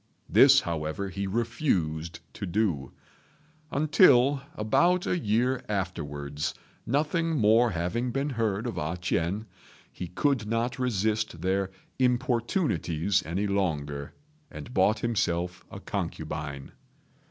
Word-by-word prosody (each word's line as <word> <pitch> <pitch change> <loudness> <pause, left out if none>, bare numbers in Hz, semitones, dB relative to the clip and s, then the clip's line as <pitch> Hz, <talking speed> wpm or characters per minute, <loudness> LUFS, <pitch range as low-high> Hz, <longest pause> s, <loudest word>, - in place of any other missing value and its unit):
This, - - +7
however, 80 +3 -3
he 100 +1 -3
refused 90 - -1
to 100 - -5
do; 90 -8 0 0.8
until, 145 -3 +5
about 175 +12 +2
a 175 - 0
year 125 +1 +1
afterwards, 75 -7 -3 0.3
nothing 155 +4 +1
more 115 +1 +5
having 100 +7 -1
been 135 +4 -1
heard 110 -3 -1
of 120 - -3
A 80 +4 -2
ch'ien, 90 +4 -1 0.5
he 90 - -6
could 120 - 0
not 115 +3 -1
resist 110 -6 0
their 95 +1 +1 0.3
importunities 120 - +1
any 95 +5 -1
longer, 75 -8 -2 0.3
and 120 - -9
bought 100 +2 +3
himself 90 -6 -1
a - - -8
concubine. 70 -2 -5
105 Hz, 110 wpm, -28 LUFS, 85-125 Hz, 0.8 s, This